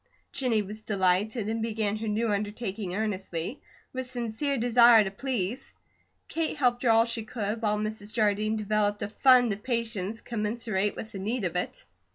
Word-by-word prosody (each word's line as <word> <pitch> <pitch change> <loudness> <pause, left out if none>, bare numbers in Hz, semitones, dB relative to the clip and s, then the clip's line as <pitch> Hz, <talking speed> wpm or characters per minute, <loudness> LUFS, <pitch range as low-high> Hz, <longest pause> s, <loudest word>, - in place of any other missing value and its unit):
Jennie 235 -5 +1
was 210 +2 -8
delighted, 205 +2 +1
and 225 +1 -1
began 215 -2 -1
her 220 +1 -4
new 215 +1 0
undertaking 205 -2 -3
earnestly, 200 - -3 0.3
with 260 -1 -3
sincere 245 +3 -2
desire 235 -1 +6
to 195 - -4
please. 245 +1 -3 0.5
Kate 325 -1 -2
helped 245 -3 +2
her 245 - +2
all 225 0 +6
she 230 -1 -2
could, 215 0 -3
while 210 -1 +1
Mrs. 215 0 -4
Jardine 215 -1 +1
developed 210 -1 0
a 205 - -3
fund 250 -4 +6
of 200 - -8
patience 225 -3 -2
commensurate 215 -2 -1
with 220 - -7
the 200 - -6
need 220 +4 -2
of 175 - -2
it. 180 - -3
220 Hz, 170 wpm, -28 LUFS, 205-235 Hz, 0.5 s, desire